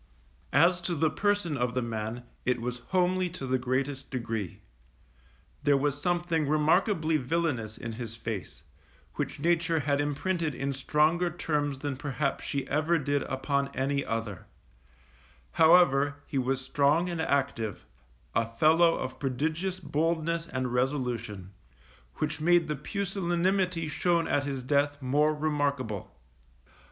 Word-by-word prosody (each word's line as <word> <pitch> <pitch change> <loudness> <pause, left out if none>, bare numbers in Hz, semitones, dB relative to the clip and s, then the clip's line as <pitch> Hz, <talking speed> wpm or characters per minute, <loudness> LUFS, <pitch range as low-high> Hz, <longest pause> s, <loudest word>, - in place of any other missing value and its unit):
As 180 +1 +5
to 175 0 -2
the 155 0 +2
person 205 -6 0
of 125 -2 -1
the 125 - +1
man, 115 +1 -4 0.2
it 125 -1 +1
was 125 +1 -4
homely 185 0 +2
to 170 -6 -7
the 130 0 +1
greatest 130 +2 -2
degree. 115 -7 -4 1.0
There 145 -1 +4
was 145 +1 -1
something 175 -3 0
remarkably 160 +2 +2
villainous 130 -6 -1
in 115 - -5
his 115 -1 -5
face, 110 -4 -6 0.5
which - - -3
nature 165 0 +2
had 145 0 +1
imprinted 150 +1 -1
in 140 +1 -2
stronger 155 +6 +2
terms 150 -4 -1
than 140 -1 -4
perhaps 140 0 -2
she 140 -1 -2
ever 155 +4 +2
did 145 -1 0
upon 140 +1 -1
any 140 +1 0
other; 115 -5 -4 1.0
however, 160 -4 +5
he 140 - -2
was 130 +1 0
strong 145 +6 +2
and 170 -2 -2
active, 125 - -1 0.5
a 115 0 +1
fellow 165 +4 +5
of 130 0 -5
prodigious 155 +8 -1
boldness 165 +2 -1
and 130 -1 -3
resolution, 120 -7 -2 0.6
which 155 0 -2
made 175 0 +4
the 150 - -1
pusillanimity 180 - 0
shown 170 +2 +1
at 145 - +1
his 135 -3 -3
death 145 +2 +1
more 145 +3 +2
remarkable. 145 -8 -1
145 Hz, 135 wpm, -29 LUFS, 130-165 Hz, 1.0 s, As